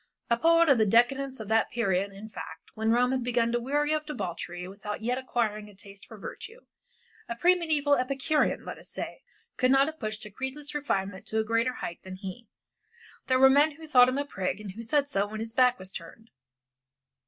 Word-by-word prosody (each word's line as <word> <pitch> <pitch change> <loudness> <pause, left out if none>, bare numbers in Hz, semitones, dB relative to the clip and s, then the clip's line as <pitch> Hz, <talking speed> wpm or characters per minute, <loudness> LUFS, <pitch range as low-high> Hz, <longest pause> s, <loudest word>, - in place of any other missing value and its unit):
A - - +6
poet 335 +4 +5
of 275 -5 +5
the 220 - +5
decadence 265 +5 +2
of 220 - -7
that 225 0 +3
period 200 -4 0
in 200 +2 -10
fact 165 -6 -10
when 220 0 -1
Rome 250 +2 +3
had 260 -2 0
begun 235 -1 +1
to 240 - +1
weary 295 +5 0
of 310 0 0
debauchery 180 - -5
without 205 +2 -6
yet 250 +3 0
acquiring 215 -5 -2
a 205 - -16
taste 200 0 -12
for 220 - -11
virtue, 450 - -9 0.7
a 235 - -2
pre 350 +9 +4
mediæval 300 -5 +2
Epicurean, 275 +4 0
let - - -7
us - - -9
say, - - -6 0.4
could 255 - +3
not 270 +1 +5
have 315 +1 -6
pushed 215 -2 -5
a 210 - -10
creedless 265 +6 -5
refinement 195 -10 -2
to 220 - -1
a 220 - +3
greater 230 +3 +1
height 170 - -6
than 185 0 -8
he. 195 +4 -8 0.8
There 255 - +3
were 265 +1 +8
men 290 +3 +4
who 320 +2 -12
thought 250 -4 +6
him 255 - -2
a 285 - 0
prig, 190 -7 -3
and 210 -2 -7
who 220 +5 -8
said 280 +5 +1
so 205 -7 0
when 215 +1 -6
his 225 0 -5
back 250 0 +4
was 190 -3 -5
turned. 225 +7 -10
240 Hz, 215 wpm, -28 LUFS, 210-275 Hz, 0.8 s, were